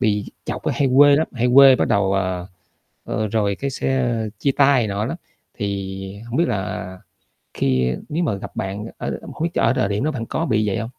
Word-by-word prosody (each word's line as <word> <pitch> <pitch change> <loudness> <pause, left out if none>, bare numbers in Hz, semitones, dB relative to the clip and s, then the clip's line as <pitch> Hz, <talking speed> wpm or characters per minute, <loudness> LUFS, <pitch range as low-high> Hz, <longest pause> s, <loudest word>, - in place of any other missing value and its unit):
bị 105 -1 +1 0.2
chọc - - -5
là - - +2
hay 140 - +2
quê 145 0 +7
lắm, 160 - +1
hay 125 -1 0
quê 135 -1 +9
bắt - - 0
đầu 100 -1 +2
à, 90 -2 -1 0.6
ờ, 110 0 -2
rồi 100 -2 0
cái 140 - -1
sẽ 130 -2 0 0.3
chia 140 - +1
tay 140 -2 +5
này 110 - 0
nọ 100 +1 -2
lắm, 135 +8 -3 0.4
thì 100 -1 -5
hổng 120 +2 -4
biết 170 - +2
là 95 -1 -4 0.6
khi 65 -2 +1 0.2
nếu 165 +4 -1
mà 125 -11 0
gặp 100 - -9
bạn 100 +2 -4
ở - - -4 0.2
không 160 - -5
biết 170 - +1
ch - - -1
ở 115 - +3
thời 105 -6 0
điểm 105 +3 -1
đó 155 - +1
bạn 115 -5 -4
có 165 - -2
bị 110 -7 +1
vậy 100 - 0
hông? 115 - -4
110 Hz, 230 wpm, -21 LUFS, 100-135 Hz, 0.6 s, quê